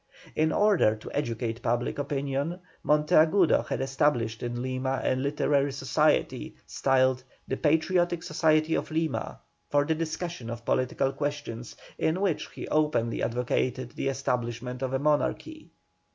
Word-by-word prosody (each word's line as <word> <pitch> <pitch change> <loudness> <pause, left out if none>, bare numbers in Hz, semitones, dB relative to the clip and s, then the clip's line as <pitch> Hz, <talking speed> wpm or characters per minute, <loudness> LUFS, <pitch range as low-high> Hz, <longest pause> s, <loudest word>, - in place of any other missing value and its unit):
In 155 +1 +2
order 200 - +4
to 110 - -10
educate 115 -4 -2
public 120 +3 -1
opinion 140 +4 -2 0.2
Monteagudo 155 +4 +4
had - - -2
established 135 -5 0
in 120 0 -3
Lima 130 +1 -1
a - - +2
literary 140 +1 +1
society, 135 -2 +1
styled 130 -1 +2 0.2
"The 130 - -2
Patriotic 165 +2 +2
Society 155 0 +2
of - - -1
Lima," 160 0 -2 0.3
for 145 0 +3
the 160 - +1
discussion 165 -4 -4
of 115 0 -6
political 130 +1 +1
questions, 145 -6 -4 0.2
in 160 +3 +1
which 190 -6 0
he - - -8
openly 150 -7 +1
advocated 125 +1 -1
the - - -3
establishment 125 -2 -2
of 130 -1 -1
a - - +3
monarchy. 150 - -1
140 Hz, 135 wpm, -28 LUFS, 125-155 Hz, 0.3 s, order